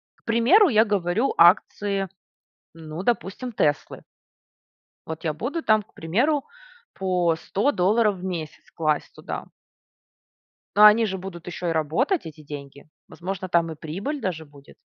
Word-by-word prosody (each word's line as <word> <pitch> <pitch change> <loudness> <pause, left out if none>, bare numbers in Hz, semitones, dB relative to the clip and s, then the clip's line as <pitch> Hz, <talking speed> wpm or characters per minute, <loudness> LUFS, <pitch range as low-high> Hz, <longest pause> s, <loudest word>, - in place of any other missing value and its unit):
К - - -35
примеру, 255 - +5
я 220 -3 +5
говорю 205 +4 0
акции, 195 +2 +3 0.7
ну, 160 +1 -7
допустим, 235 +2 -2
"Теслы". 145 -8 -1 1.0
Вот 160 +1 -7
я 160 - 0
буду 245 - -4
там, 215 -4 +3
к 210 - -31
примеру, 250 - 0 0.5
по 180 -3 +1
100 205 - 0
долларов 210 +2 +2
в 180 - -10
месяц 165 -4 -6
класть 155 -2 -1
туда. - - -6 1.3
Но 210 - +8
они 210 +2 +8
же 190 -2 -3
будут 180 -2 -9
еще 175 0 -4
и - - +1
работать, 165 - 0
эти 155 -1 -10
деньги, 140 -1 -10 0.2
возможно, 185 +1 -5
там 170 -2 +1
и - - -10
прибыль 195 - -5
даже 170 -7 -3
будет. 145 -1 -17
185 Hz, 145 wpm, -24 LUFS, 160-220 Hz, 1.3 s, Но